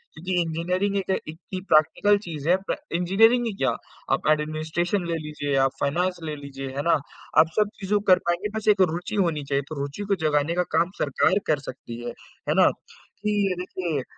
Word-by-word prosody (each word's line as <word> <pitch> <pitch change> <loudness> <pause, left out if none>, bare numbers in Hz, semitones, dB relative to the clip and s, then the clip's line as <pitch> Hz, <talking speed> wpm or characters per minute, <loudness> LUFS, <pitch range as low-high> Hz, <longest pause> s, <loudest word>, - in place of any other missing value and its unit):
क्योंकि 185 +3 -4
इंजीनियरिंग 180 +5 -1
एक 195 -1 -3 0.2
इतनी 170 +4 -7
प्रैक्टिकल 205 +7 +4
चीज 155 -3 -5
है, 180 - +6
प्रे 195 - -3 0.2
इंजीनियरिंग 225 +7 +4
ही 225 - -1
क्या, 130 -2 +2 0.4
आप - - -1
एडमिनिस्ट्रेशन 155 +4 -1
ले 165 - -1
लीजिए, 145 -2 -3
आप 135 - +2
फ़ाइनेंस 175 +5 0
ले 155 -1 -3
लीजिए, 135 -1 -7
है - - +1
ना? 170 - +3 0.5
आप 160 - +7
सब 210 -1 +3
चीज़ों 205 +1 +1
को - - -16
कर 180 - +4
पाएँगे, 180 +5 0
बस 215 - -5
एक 195 - -1
रुचि 180 +5 -4
होनी 165 -7 +1
चाहिए, 140 0 +2
तो 155 - -5
रुचि 145 +9 -4
को - - +3
जगाने 150 +2 +2
का 180 - +2
काम 170 +3 +2
सरकार 170 +7 +2
कर 150 -2 +2
सकती 120 -2 -8
है। 120 - -4 0.4
है - - +4
ना? - - +7 0.6
कि 200 -3 +1
देखिए 175 -6 -3
170 Hz, 195 wpm, -25 LUFS, 150-190 Hz, 0.6 s, आप